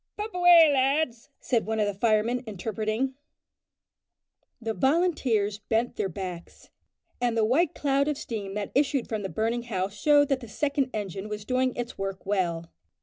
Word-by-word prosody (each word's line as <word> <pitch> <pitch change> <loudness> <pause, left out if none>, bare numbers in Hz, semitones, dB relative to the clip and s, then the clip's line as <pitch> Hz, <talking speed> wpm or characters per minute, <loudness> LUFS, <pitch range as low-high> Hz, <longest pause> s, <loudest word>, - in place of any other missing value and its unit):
"Pump 425 +1 -5
away, 350 -2 +7
lads!" 270 -2 +1
said 235 -4 0
one 220 0 -1
of 210 - +3
the 205 - -1
firemen, 225 +4 +1
interpreting. 215 +5 -2 1.5
The 225 -1 -3
volunteers 265 - +1
bent 225 +3 -1
their 195 - -1
backs, 180 -1 -8 0.5
and 240 -2 +1
the 220 - +3
white 330 +10 +2
clouds 280 0 +1
of 295 - -1
steam 205 -7 -5
that 210 -1 -3
issued 275 -2 +1
from 220 -2 -3
the 195 - -4
burning 225 +3 -1
house 190 -1 -2
showed 290 +6 +4
that 275 -2 +1
the 240 - -10
second 280 +1 -1
engine 205 -2 -5
was 210 -1 -5
doing 255 +1 0
its 240 0 -5
work 195 0 -4
well. 175 -4 -1
230 Hz, 165 wpm, -27 LUFS, 205-275 Hz, 1.5 s, away